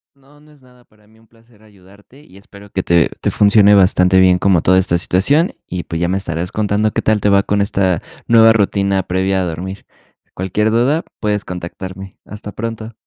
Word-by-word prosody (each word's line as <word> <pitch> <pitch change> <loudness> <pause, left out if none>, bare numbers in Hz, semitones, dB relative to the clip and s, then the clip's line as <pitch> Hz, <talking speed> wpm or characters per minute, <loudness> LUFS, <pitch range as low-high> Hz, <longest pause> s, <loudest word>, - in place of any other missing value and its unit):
No, 140 +2 -24
no 150 +1 -22
es 145 -3 -23
nada 125 -1 -23
para 105 -2 -29
mí, 110 +1 -25
un 115 - -26
placer 115 -1 -26
ayudarte 105 +6 -21
y 95 - -19
espero 100 +1 -14
que 95 - -2
te 85 -1 +2
te - - 0
funcione 105 0 +4
bastante 95 -1 +3
bien 90 -1 +4
como 95 -4 +2
toda 95 +1 +3
esta 90 -2 +2
situación 135 - +2
y, 90 -1 -5
pues, 80 0 -5
ya 85 - +1
me 95 - -1
estarás 85 -2 -4
contando 105 0 -1
qué - - -2
tal 110 -2 +1
te 105 - +1
va 100 0 +3
con 100 0 -1
esta 95 -4 0 0.3
nueva 115 -1 +6
rutina 100 -2 0
previa 95 +1 -1
a 90 - -2
dormir. 90 +4 -7 0.5
Cualquier 105 +4 -2
duda, 130 +8 +1 0.2
puedes 105 -1 -2
contactarme. 95 +2 -9
Hasta 105 0 -10
pronto. 115 +1 -7
100 Hz, 200 wpm, -16 LUFS, 95-110 Hz, 0.5 s, nueva